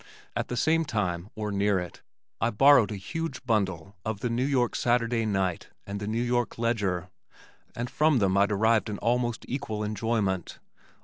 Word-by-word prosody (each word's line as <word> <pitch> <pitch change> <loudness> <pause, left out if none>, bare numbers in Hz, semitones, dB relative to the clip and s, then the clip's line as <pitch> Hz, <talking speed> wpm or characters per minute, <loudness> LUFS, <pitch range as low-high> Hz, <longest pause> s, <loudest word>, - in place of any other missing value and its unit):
At - - -1
the 125 - -4
same 160 +5 +3
time 100 - -2
or 105 -1 -3
near 100 0 +2
it 90 -1 -6 0.4
I - - +3
borrowed 125 0 +5
a - - -3
huge 140 - -5
bundle 100 -5 -1
of 110 -2 -3
The 120 - -1
New 125 +3 0
York 125 -4 +1
Saturday 115 -1 +1
Night 95 -4 -1 0.2
and 100 0 -5
The 105 - -5
New 115 +3 0
York 120 -1 0
Ledger 100 -6 -1 0.6
and 120 +1 -3
from 150 +2 +3
them 100 -4 +2
I 100 +1 +4
derived 110 +2 +2
an 105 - -3
almost 120 0 0
equal 110 -5 -3
enjoyment. 105 -4 -1
110 Hz, 175 wpm, -27 LUFS, 100-120 Hz, 0.6 s, borrowed